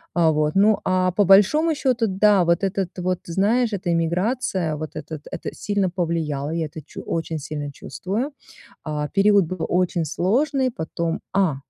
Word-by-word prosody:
Э, 165 -2 +4
вот, 150 0 0
ну, 210 +2 +4
а 185 0 +1
по 200 +3 +2
большому 210 - +5
счёту 255 -6 +1
да, 195 0 +4
вот 170 +2 +1
этот 190 -2 -2
вот, 180 0 -1
знаешь, 215 +7 +1
эта 185 -3 -3
эмиграция, 170 0 0
вот 155 0 -7
этот 160 -2 -6
Это - - -5
сильно 200 -2 -1
повлияло, 160 -5 -2
я 165 -1 -1
это 155 +1 -9
чу - - -9
очень 165 -1 -2
сильно 145 0 -5
чувствую. 210 - -4 0.5
Э, 150 -1 -3
период 200 -1 +5
был 170 -1 -3
очень 180 -1 +1
сложный, 260 - +1
потом 165 +1 -2
А, 190 -7 +2
185 Hz, 165 wpm, -22 LUFS, 160-205 Hz, 0.5 s, большому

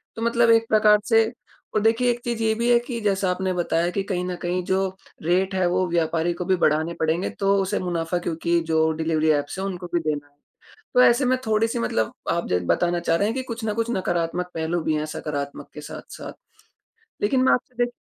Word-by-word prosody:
तो 225 - -6
मतलब 235 0 +3
एक 225 0 +4
प्रकार 210 -1 +5
से 225 -1 +5 0.5
और 210 - +3
देखिए 230 +3 +3
एक 240 - -3
चीज़ 235 -2 -3
ये 220 0 +3
भी 235 +2 +1
है 240 - +6
कि 240 -1 -5
जैसा 195 -2 +1
आपने 185 0 -1
बताया 175 -1 0
कि 195 +1 -2
कहीं 185 -3 -2
न 180 0 -3
कहीं 180 +1 -1
जो 190 0 +1 0.4
रेट 185 +3 +1
है, 185 -1 +2
वो 180 +1 +1
व्यापारी 165 0 0
को 180 - -5
भी 190 0 +3
बढ़ाने 160 +1 +1
पड़ेंगे, 160 +3 0
तो 195 0 +1
उसे 190 - -1
मुनाफ़ा 175 -1 -2
क्योंकि 170 0 0
जो 160 0 +3
डिलिवरी 160 0 0
ऐप्स 145 +5 -1
हैं 195 - -2
उनको 180 -2 -5
भी 170 - +3
देना 150 -2 -3
है। 145 0 -33 0.6
तो 250 - +6
ऐसे 240 +3 +4
में 255 +1 +2
थोड़ी-सी 225 +2 +1
मतलब 110 - -1 0.2
आप 170 - -1
ज 90 - +2
बताना 175 0 +1
चाह 165 -1 +1
रहे 200 +4 +1
हैं, 225 - -2
कि 260 - -2
कुछ 230 -2 -6
न 215 - 0
कुछ 230 +2 -1
नकारात्मक 180 -2 -1
पहलू 165 +1 -1
भी 155 - 0
हैं 150 0 -1
सकारात्मक 145 -2 -5
के - - -8
साथ-साथ। - - -9 0.9
लेकिन 255 +5 +2
मैं - - +5
आपसे 245 0 0
दे 240 - -5
185 Hz, 225 wpm, -23 LUFS, 165-225 Hz, 0.9 s, है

